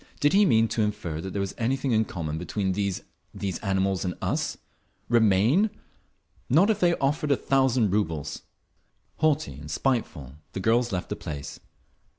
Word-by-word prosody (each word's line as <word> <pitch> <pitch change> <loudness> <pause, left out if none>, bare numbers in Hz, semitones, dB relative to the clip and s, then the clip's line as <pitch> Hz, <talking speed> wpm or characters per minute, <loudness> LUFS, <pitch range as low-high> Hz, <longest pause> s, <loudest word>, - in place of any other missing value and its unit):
Did 145 +3 +3
he 205 +1 +6
mean 115 - +4
to 115 - 0
infer 105 -7 -2
that 95 +2 -5
there 100 - -3
was 100 0 -2
anything 130 +3 0
in 110 -1 +3
common 80 -5 -4
between 95 +3 -2
these—these 100 -1 -4
animals—and 95 -2 0
us? - - -1 0.5
Remain? 115 - +4 0.8
Not 175 - +5
if 210 - -1
they 175 -2 +3
offered 145 +2 0
a 140 - +4
thousand 130 -6 +2
rubles!… 80 -8 -1 0.8
Haughty 155 -1 +1
and - - -10
spiteful 85 - -2 0.2
the - - -3
girls 115 +4 +2
left 90 -2 -3
the - - -2
place…. 70 -3 -7
105 Hz, 155 wpm, -26 LUFS, 95-135 Hz, 0.8 s, he